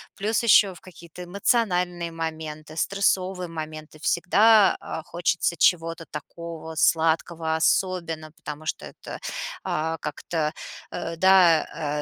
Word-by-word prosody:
Плюс, 215 +3 0
еще 200 -3 +6
в - - -16
какие-то 170 0 -12
эмоциональные 180 -3 0
моменты, 155 -1 -6
стрессовые 185 0 0
моменты, 155 -1 -8
всегда, 200 +5 +4
а, 160 - -6
хочется 170 +1 0
чего-то 165 0 +2
такого 165 -1 -8
сладкого 160 0 +1
особенно, 165 -2 0
потому 150 0 -9
что - - -4
это, - - -9 0.4
а, 160 +1 -1
как-то, 150 +1 -3 0.4
э, 165 - -4
да, 165 -5 +3
165 Hz, 110 wpm, -25 LUFS, 160-180 Hz, 0.4 s, еще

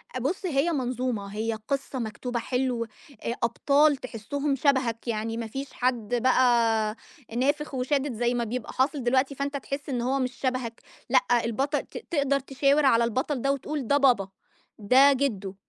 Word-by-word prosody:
أ - - -1
بُص 320 +10 -2
هي 305 0 +1
منظومة. 250 -6 -2
هي 225 +1 -1
قصة 275 -1 -2
مكتوبة 235 +2 -3
حلو، 250 -1 -1
أ 230 +1 -8
أبطال 285 +5 +3
تحسّهم 270 +4 -3
شبهك. 260 -4 +1
يعني 225 0 -2
ما 230 - -3
فيش 270 +5 -6
حد 245 -2 0
بقى 235 -3 +3 0.4
نافخ 290 +3 0
وشادد 265 +1 0
زي 240 +2 0
ما 240 -1 0
بيبقى 235 +1 -4
حاصل 270 0 0
دلوقتي 260 +3 +2
فأنت 280 +1 -2
تحس 275 +4 -6
إن 245 -3 -1
هو 265 +3 0
مش 255 -1 -1
شبهك. 255 -3 -3 0.3
لأ 245 - +3
البطل 275 +6 0
ت - - -11
تقدر 280 -3 +2
تشاور 275 +2 +2
على 235 -3 +5
البطل 255 +3 -1
ده 275 +2 +2
وتقول 280 -2 -3
ده 285 - +4
بابا، 250 -9 +3 0.5
ده 260 +7 +6
جدو، 210 -8 -2
255 Hz, 165 wpm, -26 LUFS, 235-280 Hz, 0.5 s, ده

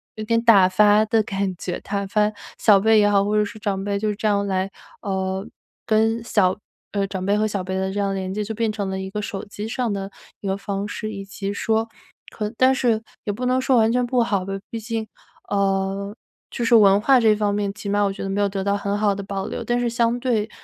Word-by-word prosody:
有 215 - -5
点 230 +1 +1
打 205 -6 +6
发 210 +2 +5
的 220 +1 +2
感 195 -2 -2
觉。 180 0 -4
打 200 -1 -3
发 210 +1 +2 0.3
小 205 -3 +5
辈 220 +2 +4
也 205 0 +4
好， 200 -1 +3
或 210 +1 0
者 210 - +4
是 215 +1 -7
长 195 -2 -2
辈， 200 0 -1
就 215 - -1
是 210 - -1
这 215 - -6
样 200 -1 +2
来， 190 0 -1 0.3
呃， 190 0 -2 0.4
跟 225 +1 +2
小 190 -5 +2 0.4
呃， 200 -1 +1
长 190 -1 -4
辈 200 +1 +2
和 215 - +2
小 205 -2 -2
辈 190 +1 -4
的 190 0 -1
这 205 - -3
样 200 -1 0
连 190 0 -3
接 210 - -2
就 215 +1 -4
变 225 0 0
成 205 -2 -3
了 190 - -3
一 190 0 -5
个 210 +2 -4
手 200 -1 -5
机 205 +1 -7
上 245 0 -2
的 195 -1 -3 0.3
一 200 - -6
个 190 - 0
方 200 0 -4
式， 215 +1 -5
以 195 -2 -7
及 195 0 -5
说 220 +2 0 0.4
可 210 -1 -3
但 260 +1 +5
是 235 -4 +1 0.2
也 205 - -1
不 250 +5 -4
能 255 +1 +2
说 260 0 +2
完 225 -1 +4
全 250 +1 +1
不 245 0 +2
好 200 -5 -1
吧， 195 - -4 0.2
毕 230 - -5
竟， 225 0 -3 0.4
呃， 195 0 -1 0.3
就 240 - -4
是 235 - +2
文 200 -2 +6
化 265 +3 +5
这 220 -2 +4
方 205 -1 0
面 205 -1 -1
起 205 - -8
码 205 +1 +1
我 200 - +1
觉 195 - -7
得 195 - -3
没 195 +1 -1
有 205 - +3
得 195 -1 -3
到 200 +1 +1
很 200 0 -2
好 205 -1 +2
的 200 - -5
保 195 0 -4
留。 - - -5
但 240 0 0
是 245 - 0
相 235 0 +1
对， 225 -4 0
205 Hz, 275 characters per minute, -22 LUFS, 195-220 Hz, 0.4 s, 打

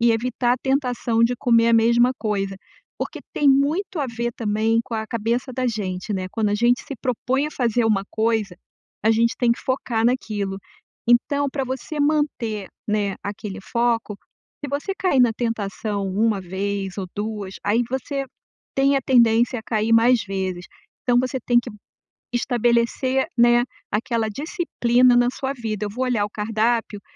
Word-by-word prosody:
e 235 0 +4
evitar 240 +1 0
a - - -8
tentação 250 -4 0
de 245 +1 +1
comer 230 -2 +3
a - - +3
mesma 235 +2 +4
coisa, 195 -3 -2 0.4
porque - - -4
tem 290 - +2
muito 305 +7 +2
a 275 - 0
ver 235 0 -3
também 220 0 0
com 230 - -6
a 220 0 -2
cabeça 235 +3 -1
da 255 +1 -1
gente, 205 -3 -3
né, 185 -1 -2
quando 220 -2 0
a 205 - +1
gente 240 +3 +2
se 275 - -5
propõe 260 +2 0
a - - -5
fazer 240 -4 +1
uma 200 -3 +2
coisa, 220 -4 0 0.5
a 220 - +5
gente 230 +1 +2
tem 245 -2 +3
que - - -6
focar 240 -3 -1
naquilo, 210 -6 -1 0.5
então 280 +4 +3
pra 275 0 -2
você 265 +4 -4
manter, 285 -9 0 0.2
né, 205 -2 0
aquele 200 -1 -6
foco, 235 -3 0 0.5
se - - -3
você 290 +8 -2
cair 280 -9 +2
na 240 -2 +5
tentação 210 -3 -3
1 210 +1 +1
vez 195 +1 -3
ou 190 - -3
2 205 -2 -4
aí 220 +4 +2
você 275 +1 -2 0.5
tem 275 +1 +3
a - - +2
tendência 240 -1 +4
a - - -8
cair 220 0 0
mais 235 +1 +5
vezes, 190 -2 -3 0.4
então 245 -1 +3
você 255 +1 -2
tem 240 -1 +5
que 240 - -8 0.6
estabelecer, 245 +2 +1
né, 240 0 +5 0.3
aquela 225 +1 0
disciplina 255 - +2
na 245 0 +4
sua 265 +1 -3
vida, 220 -5 -4
eu 205 - -3
vou 255 +5 -2
olhar 235 -5 +1
o 205 - -7
cardápio, 220 0 -1
235 Hz, 170 wpm, -22 LUFS, 210-255 Hz, 0.6 s, a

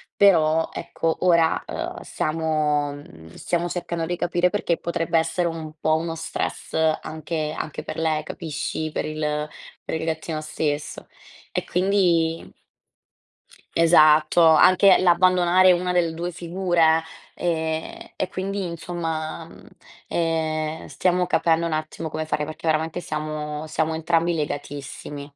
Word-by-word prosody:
però 165 -5 +4
ecco, 165 -1 -2
ora, 170 -3 +3
uhm, - - -5
stiamo, 155 -2 -1
mhmm, 80 - -13
stiamo 175 0 -1
cercando 170 -1 -3
di 175 +2 -2
capire 175 +1 +1
perché 175 -5 0
potrebbe 165 -1 -1
essere 175 +2 0
un 160 -2 -5
po' 155 0 +2
uno 165 0 -3
stress 165 0 -4 0.3
anche 155 0 -4
anche 155 - -5
per - - -6
lei, 160 -1 0
capisci? 155 -1 -4
Per - - -2
il 150 -1 -2 0.3
per - - -4
il - - -4
gattino 160 0 -3
stesso 150 -1 -3 0.4
e - - -2
quindi 175 -3 +1 1.2
Esatto, 160 0 +5
anche 185 +4 +6
l'abbandonare 185 +1 +5
una 180 +1 -1
delle 170 -2 +1
2 175 +2 -3
figure, 170 -2 +2 0.3
ehm, 160 -2 -3
e 185 - -2
quindi, 195 +1 -3
insomma, 165 -1 -4
mhmm, - - -16 0.4
ehm, 160 -1 -1
stiamo 180 -1 +1
capendo 170 -1 +2
un 160 - -3
attimo 155 +1 -4
come 155 +1 -3
fare, 150 -1 -1
perché 155 +2 -9
veramente 160 +2 0
siamo 155 -1 -4
siamo 160 +1 -1
entrambi 165 +1 +1
legatissimi. 145 -1 -5
160 Hz, 130 wpm, -23 LUFS, 155-175 Hz, 1.2 s, anche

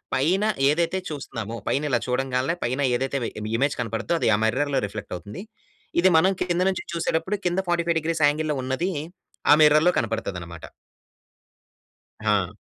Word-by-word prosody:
పైన 175 +10 +2 0.3
ఏదైతే 170 +4 +1
చూస్తన్నామో, 115 -6 -5
పైనిలా 140 -4 +1
చూడంగాల్నే, 130 +4 0
పైన 130 +4 -1 0.2
ఏదైతే 135 +1 -2
వి - - -2 0.3
ఇమేజ్ 140 +3 +1
కనపడుద్దో, 115 +8 -2
అది - - +3
ఆ - - 0
మిర్రర్‌లో 140 +4 +1
రిఫ్లెక్ట్ 105 -1 -7
అవుతుంది. 105 - -9 0.6
ఇది, 185 - +6
మనం 190 +4 +4
కింద 175 0 0
నుంచి 185 - -3
చూసేటప్పుడు, 165 +3 -1
కింద 175 +2 0
45 170 -1 +1
డిగ్రీస్ 160 -1 -1
యాంగిల్‌లో 150 0 0
ఉన్నదీ, 145 +9 -1 0.6
ఆ - - +11
మిర్రర్‌లో 155 +4 +5
కనపడతదనమాట. - - -4 1.6
హా! - - +1
150 Hz, 135 wpm, -24 LUFS, 130-170 Hz, 1.6 s, ఆ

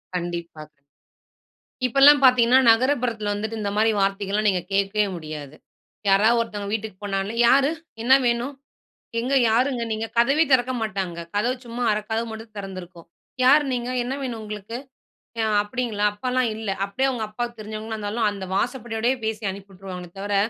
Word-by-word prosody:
கண்டிப்பா, 170 -2 -4
கண் 140 - -42 1.1
இப்பல்லாம் 280 +4 +7
பாத்தீங்கன்னா, 250 -1 +6
நகரப்புறத்துல 235 -4 +1
வந்துட்டு 220 +2 -4
இந்த 205 -1 -2
மாரி 220 +1 +3
வார்த்தைகள்லாம் 200 +2 0
நீங்க 180 -2 0
கேட்கவே 200 +1 +2
முடியாது. 155 -3 -8 0.5
யாராவது 215 +5 +5
ஒருத்தவங்க 205 -3 -5
வீட்டுக்கு 220 -3 -4
போனாலே, 195 +1 -2
"யாரு? 275 +4 +5 0.3
என்ன 260 +2 +5
வேணும்? 240 +4 0 0.7
எங்க 260 +3 -1 0.2
யாருங்க 245 +1 +1
நீங்க?" 220 +1 -2
கதவே 275 +7 +4
திறக்க 255 0 +3
மாட்டாங்க. 190 -5 -3 0.2
கதவு 245 +5 +1
சும்மா 235 +1 -5
1/2 210 0 -1
கதவு 225 +1 -1
மட்டும் 220 0 -10
தெறந்திருக்கும். 185 -3 -8 0.4
"யார் 290 +3 +6
நீங்க? 245 0 -2
என்ன 265 +3 -3
வேணும் 235 -4 -4
உங்களுக்கு? 210 +2 -6 0.6
அ - - +2 0.2
அப்படீங்களா? 210 -2 -2
அப்பால்லாம் 250 +2 0
இல்லை" 210 -3 -3
அப்படியே 260 +7 0
அவுங்க 225 -4 -3
அப்பாவுக்கு 235 +1 -5
தெரிஞ்சவங்களா 215 +1 -6
இருந்தாலும், 215 +1 -1
அந்த 195 -2 -6
வாசப்படியோடையே 240 +2 -1
பேசி 220 0 -3
அனுப்பி 195 +1 -11
வுட்ருவாங்களே 180 -2 -8
தவிர, 205 0 -2
220 Hz, 150 wpm, -23 LUFS, 200-245 Hz, 1.1 s, இப்பல்லாம்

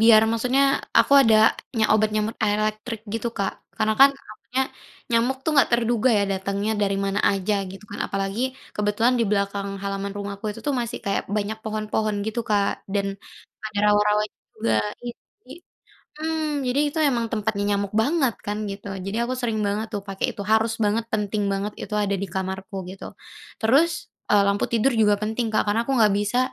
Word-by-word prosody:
biar 220 -1 +7
maksudnya 250 +4 +2 0.4
aku - - +4
ada 220 -2 +5 0.2
nya 220 - +4
obat 215 0 +3
nyamuk 215 +1 -1
elektrik 215 +2 -1
gitu, 230 +1 -1
Kak. 200 -4 -2 0.3
Karena 215 0 +2
kan 275 +1 +10
takutnya 230 +4 -4 0.5
nyamuk 235 +3 +2
tuh - - +1
enggak 275 - +4
terduga 235 +1 +2
ya 200 - +2
datangnya 200 +2 -2
dari 195 -1 +1
mana 195 0 0
saja 200 +1 +2 0.2
gitu 195 +2 -11
kan. 205 - -7
Apalagi 195 +2 -2 0.3
kebetulan 210 +4 +2
di 240 - +2
belakang 200 -1 -1
halaman 200 0 -3
rumahku 200 0 -6
itu 220 +2 -8
tuh 290 - +1
masih 235 -1 -4
kayak 200 - 0
banyak 210 +1 -2
pohon-pohon 215 0 -1
gitu 220 +2 -2
Kak 205 -2 0
dan, 200 -1 +1 0.6
ada 215 -1 -5
rawa-rawa 210 0 +3 0.3
juga 115 - 0 0.3
iya 240 -1 -5 0.3
jadi - - -19 0.7
mmm, 310 -3 -1
jadi 250 +3 +1
itu 290 - -5
emang 235 -3 0
tempatnya 215 -2 -1
nyamuk 200 -1 -3
banget 275 -3 +1
kan 205 +1 -2
gitu. 200 +1 -8 0.2
Jadi 195 - -3
aku 245 +2 -1
sering 225 -3 -1
banget 210 +2 -1
tuh 200 - -2
pakai 195 0 -1
itu, 200 - -5
harus 220 +1 +3
banget, 215 +2 +1
penting 210 0 -1
banget, 200 +2 -2
itu 210 - -5
ada 200 -1 0
di - - -1
kamarku 190 +1 -4
gitu. 195 - -10 0.6
Terus, 275 +10 +4 0.4
eee, 205 -1 +6
lampu 200 0 +1
tidur 235 +3 +3
juga 210 -1 +5
penting 220 +3 -1
Kak, - - +4
karena 210 +2 +2
aku 275 - 0
enggak 215 -4 +4
bisa, 210 +4 0
215 Hz, 180 wpm, -24 LUFS, 200-230 Hz, 0.7 s, kan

